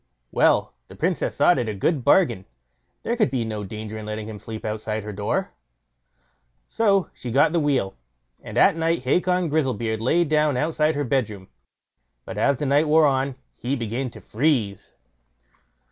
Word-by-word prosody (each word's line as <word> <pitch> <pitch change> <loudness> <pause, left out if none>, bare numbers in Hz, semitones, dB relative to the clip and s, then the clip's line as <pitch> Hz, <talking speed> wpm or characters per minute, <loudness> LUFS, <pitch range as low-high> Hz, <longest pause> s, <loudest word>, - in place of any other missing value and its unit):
Well, - - +3
the - - -13
Princess - - -1
thought - - +4
it 120 -3 -2
a 105 - -3
good 135 - 0
bargain; 120 - +3 0.6
there 235 - -1
could 220 -4 +2
be 125 -4 -1
no 105 -2 -4
danger 110 +2 -6
in 110 - -8
letting 110 0 -5
him 110 -2 -7
sleep 110 +1 -8
outside 110 0 -3
her 105 0 -6
door. 100 +1 -2 1.1
So 200 -4 +1
she 125 - -7
got 145 +7 +3
the 170 - +3
wheel, 135 -10 0 0.5
and 105 - -7
at 185 +8 +5
night 165 -3 0
Hacon 180 +6 +1
Grizzlebeard 120 -8 -1
lay 160 +9 +3
down 150 -3 +1
outside 155 +2 +1
her 145 - -1
bedroom. 110 -7 -2 0.8
But - - -6
as 140 -1 +2
the 145 - -3
night 145 +3 +3
wore 155 +1 +5
on 135 -1 +1 0.2
he 130 +3 -3
began 120 +2 -3
to - - -13
freeze. 115 - -1
130 Hz, 170 wpm, -23 LUFS, 110-155 Hz, 1.1 s, at